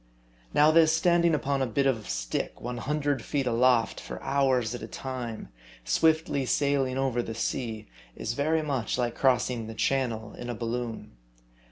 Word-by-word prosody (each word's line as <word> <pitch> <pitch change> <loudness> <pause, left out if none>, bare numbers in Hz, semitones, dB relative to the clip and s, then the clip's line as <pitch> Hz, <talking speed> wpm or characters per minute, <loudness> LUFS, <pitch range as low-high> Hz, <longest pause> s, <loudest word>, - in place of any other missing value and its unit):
Now 150 +1 +5
this 160 0 +6
standing 170 -1 +3
upon 140 -1 -1
a 130 - +1
bit 135 +4 0
of 115 -6 0
stick - - -3
100 140 +2 -2
feet 140 -2 -1
aloft 120 -1 +3
for - - -7
hours 130 -4 +1
at 120 - -6
a - - -6
time, 125 - -6 0.4
swiftly 160 - +2
sailing 135 -1 +1
over 130 -3 0
the 115 -1 -6
sea, 115 -1 -3 0.3
is 115 - -3
very 155 +5 +1
much 135 -7 -1
like 120 -2 0
crossing 125 -3 +1
the 110 - -7
Channel 115 -4 -1
in 120 - -7
a 120 - -3
balloon. 115 0 -4
130 Hz, 160 wpm, -28 LUFS, 115-140 Hz, 0.4 s, this